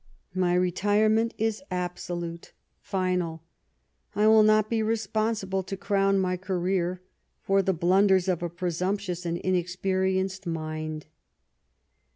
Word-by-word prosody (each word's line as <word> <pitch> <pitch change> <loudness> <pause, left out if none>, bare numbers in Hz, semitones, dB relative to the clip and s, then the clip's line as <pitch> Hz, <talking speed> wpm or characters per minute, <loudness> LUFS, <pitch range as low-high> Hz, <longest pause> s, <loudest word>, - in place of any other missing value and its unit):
My 180 -1 +1
retirement 210 +5 +2
is 220 +1 -1
absolute, 175 -1 -5 0.3
final; 180 -4 -2 0.7
1 210 +1 +3
will 220 0 +7
not 215 0 +4
be 225 -1 0
responsible, 215 -2 -1
to 195 +1 -6
crown 195 0 +2
my 185 -1 0
career, 185 -1 -1 0.4
for 195 0 +3
the 190 - +1
blunders 190 +2 +3
of 180 -3 0
a 175 - -2
presumptuous 180 +1 -2
and 170 0 -1
inexperienced 185 +1 -1
mind." 155 -1 -4
185 Hz, 115 wpm, -27 LUFS, 175-200 Hz, 0.7 s, will